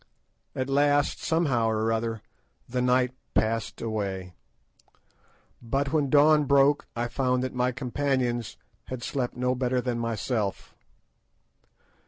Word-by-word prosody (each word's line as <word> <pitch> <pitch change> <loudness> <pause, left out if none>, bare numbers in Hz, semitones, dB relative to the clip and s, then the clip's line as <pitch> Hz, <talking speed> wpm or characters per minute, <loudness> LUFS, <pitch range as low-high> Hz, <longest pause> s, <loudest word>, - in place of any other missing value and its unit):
At 130 0 -2
last, 145 +1 +2
somehow 145 -9 +1
or 110 0 0
other, 115 -1 -2 0.4
the 125 +1 -2
night 125 0 +2 0.2
passed 115 0 0
away; 100 -5 -3 1.3
but 135 +4 -1
when 145 -3 +2
dawn 150 +1 +5
broke 140 +1 +3
I 120 +1 -1
found 125 0 0
that 130 - -3
my 125 0 +1
companions 130 -2 -1 0.3
had 130 -2 -6
slept 130 -3 -2
no 125 0 +1
better 125 0 0
than 125 -1 -2
myself. 115 -2 -2
125 Hz, 120 wpm, -27 LUFS, 115-135 Hz, 1.3 s, dawn